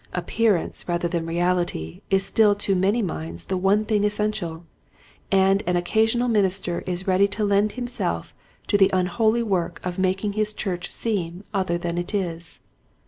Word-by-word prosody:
Appearance 220 Hz, -7 st, 0 dB
rather 175 Hz, 0 st, 0 dB
than 170 Hz, -1 st, -2 dB
reality 175 Hz, -, -1 dB
is 195 Hz, 0 st, +2 dB
still 205 Hz, +1 st, +4 dB
to 205 Hz, -1 st, -1 dB
many 200 Hz, +5 st, +2 dB
minds 85 Hz, -, -3 dB
the -, -, -2 dB
one 195 Hz, +3 st, +2 dB
thing 210 Hz, -2 st, +1 dB
essential, 205 Hz, -6 st, -2 dB, 0.7 s
and 195 Hz, 0 st, +4 dB
an 180 Hz, -, +2 dB
occasional 220 Hz, +7 st, +1 dB
minister 195 Hz, -5 st, +1 dB
is 180 Hz, 0 st, -3 dB
ready 190 Hz, +1 st, +4 dB
to 210 Hz, +1 st, -2 dB
lend 205 Hz, +1 st, +2 dB
himself 245 Hz, 0 st, -3 dB, 0.3 s
to 205 Hz, -, +2 dB
the 195 Hz, -, +6 dB
unholy 215 Hz, +6 st, +2 dB
work 190 Hz, -6 st, -1 dB
of 180 Hz, 0 st, -4 dB
making 190 Hz, +2 st, 0 dB
his 215 Hz, 0 st, -1 dB
church 180 Hz, -3 st, -3 dB
seem 185 Hz, -5 st, -3 dB
other 185 Hz, -3 st, 0 dB
than 175 Hz, 0 st, -3 dB
it 175 Hz, +4 st, -4 dB
is. 170 Hz, -4 st, -4 dB
190 Hz, 160 wpm, -24 LUFS, 175-210 Hz, 0.7 s, the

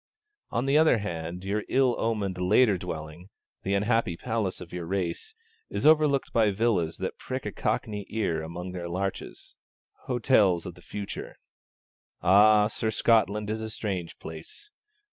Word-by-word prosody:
On 120 Hz, +3 st, -1 dB
the 140 Hz, +2 st, +4 dB
other 160 Hz, -6 st, +5 dB
hand, 85 Hz, -3 st, -5 dB
your 100 Hz, +2 st, -1 dB
ill 130 Hz, -2 st, +3 dB
omened 100 Hz, -5 st, -1 dB
later 105 Hz, +4 st, +4 dB
dwelling, 80 Hz, +1 st, -7 dB, 0.3 s
'the 100 Hz, +1 st, 0 dB
unhappy 105 Hz, -3 st, +1 dB
palace 110 Hz, -4 st, -2 dB
of 90 Hz, -1 st, -10 dB
your 85 Hz, -2 st, -5 dB
race,' 95 Hz, -, -3 dB, 0.3 s
is -, -, -3 dB
overlooked 150 Hz, -3 st, +4 dB
by 110 Hz, -3 st, +4 dB
villas 95 Hz, -6 st, +1 dB
that -, -, -4 dB
prick -, -, -5 dB
a -, -, -2 dB
cockney 105 Hz, -2 st, -2 dB
ear 100 Hz, -8 st, -1 dB
among 85 Hz, +3 st, -6 dB
their 90 Hz, -1 st, -5 dB
larches, 95 Hz, +2 st, -4 dB, 0.5 s
hotels 110 Hz, -8 st, +3 dB
of 90 Hz, -, -6 dB
the 90 Hz, -, -17 dB
future. 100 Hz, +2 st, -6 dB, 0.9 s
Ah, 105 Hz, +3 st, +6 dB
Sir, 110 Hz, +1 st, -1 dB
Scotland 105 Hz, -1 st, +2 dB
is 110 Hz, 0 st, -3 dB
a 110 Hz, -, -4 dB
strange 95 Hz, -6 st, -4 dB
place. 80 Hz, -, -9 dB
100 Hz, 150 wpm, -27 LUFS, 90-115 Hz, 0.9 s, Ah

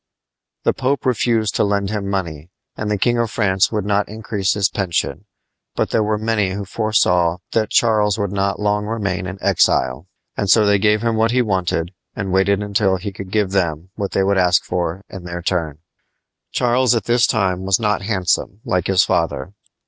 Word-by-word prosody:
The -, -, +2 dB
Pope 135 Hz, +2 st, -1 dB
refused 115 Hz, -3 st, +1 dB
to -, -, +3 dB
lend 100 Hz, -1 st, 0 dB
him 100 Hz, -2 st, -3 dB
money, 85 Hz, -5 st, -4 dB, 0.3 s
and 105 Hz, -, -4 dB
the 105 Hz, -, 0 dB
King 120 Hz, +4 st, +1 dB
of 115 Hz, -1 st, 0 dB
France 100 Hz, -3 st, +1 dB
would 105 Hz, -3 st, -2 dB
not 105 Hz, 0 st, 0 dB
increase 105 Hz, -3 st, -2 dB
his 100 Hz, -1 st, +2 dB
pension, 85 Hz, -4 st, -2 dB, 0.5 s
but -, -, -1 dB
there -, -, +2 dB
were 105 Hz, 0 st, 0 dB
many 105 Hz, -3 st, 0 dB
who 100 Hz, +1 st, -4 dB
foresaw 90 Hz, -5 st, +1 dB
that 110 Hz, -2 st, 0 dB
Charles 105 Hz, -3 st, +2 dB
would 100 Hz, -3 st, -2 dB
not 100 Hz, 0 st, -1 dB
long 105 Hz, 0 st, 0 dB
remain 100 Hz, -4 st, -2 dB
in 95 Hz, +1 st, -6 dB
exile; 65 Hz, +8 st, +2 dB, 0.3 s
and 100 Hz, -, -2 dB
so 110 Hz, +1 st, +5 dB
they 100 Hz, -1 st, +3 dB
gave 105 Hz, +2 st, +2 dB
him 115 Hz, -1 st, 0 dB
what 110 Hz, +1 st, +3 dB
he 125 Hz, +1 st, +2 dB
wanted 90 Hz, -4 st, -1 dB, 0.2 s
and 95 Hz, -1 st, -3 dB
waited 100 Hz, +1 st, +2 dB
until 100 Hz, -1 st, +1 dB
he 100 Hz, +2 st, -5 dB
could 95 Hz, -1 st, -9 dB
give 100 Hz, -1 st, 0 dB
them 90 Hz, -2 st, -1 dB
what 100 Hz, -3 st, -4 dB
they 95 Hz, -, +2 dB
would 100 Hz, 0 st, +2 dB
ask 90 Hz, -1 st, +3 dB
for 90 Hz, +2 st, -3 dB
in 95 Hz, -3 st, -9 dB
their 85 Hz, 0 st, -6 dB
turn. 85 Hz, -5 st, -1 dB, 0.7 s
Charles 125 Hz, 0 st, +2 dB
at 115 Hz, -, 0 dB
this 120 Hz, +3 st, +3 dB
time 95 Hz, -4 st, 0 dB
was 95 Hz, +2 st, +1 dB
not 105 Hz, -2 st, 0 dB
handsome, 95 Hz, -1 st, -1 dB
like 90 Hz, -7 st, 0 dB
his 95 Hz, -2 st, +4 dB
father. 70 Hz, +9 st, -1 dB
100 Hz, 195 wpm, -19 LUFS, 95-110 Hz, 0.7 s, so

